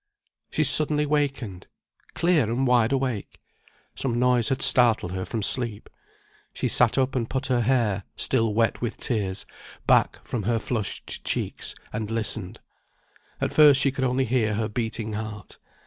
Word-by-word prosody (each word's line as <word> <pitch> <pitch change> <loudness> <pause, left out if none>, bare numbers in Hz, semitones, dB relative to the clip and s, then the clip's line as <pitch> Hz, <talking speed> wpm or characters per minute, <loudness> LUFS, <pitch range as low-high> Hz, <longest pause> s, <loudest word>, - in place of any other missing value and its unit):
She 155 - +1
suddenly 150 +1 +1
wakened! 135 -10 -2 0.5
Clear 170 -6 +3
and 120 +5 0
wide 120 -2 +3
awake! 130 -6 -2 0.5
Some 120 -3 -2
noise 125 -1 +3
had 135 - 0
startled 115 -8 +3
her 95 0 -3
from 110 -3 -3
sleep. 115 -1 +1 0.6
She - - -1
sat 120 0 +3
up, 130 0 +1
and 115 -3 -1
put 135 +1 -2
her 120 - +2
hair 115 -5 +1
(still 115 -4 +1
wet 115 +1 +1
with 120 -1 -3
tears) 100 -5 -2 0.4
back - - +3
from 120 - -2
her 115 +3 0
flushed 110 -2 -4
cheeks, - - -3 0.2
and 105 0 -3
listened. 110 -4 -3 0.8
At - - -2
first 145 -3 +7
she 140 -1 +2
could 130 0 -3
only 130 +1 +1
hear 110 -3 +1
her 110 +1 -1
beating 110 0 -3
heart. 105 -1 -7
120 Hz, 155 wpm, -25 LUFS, 110-130 Hz, 0.8 s, first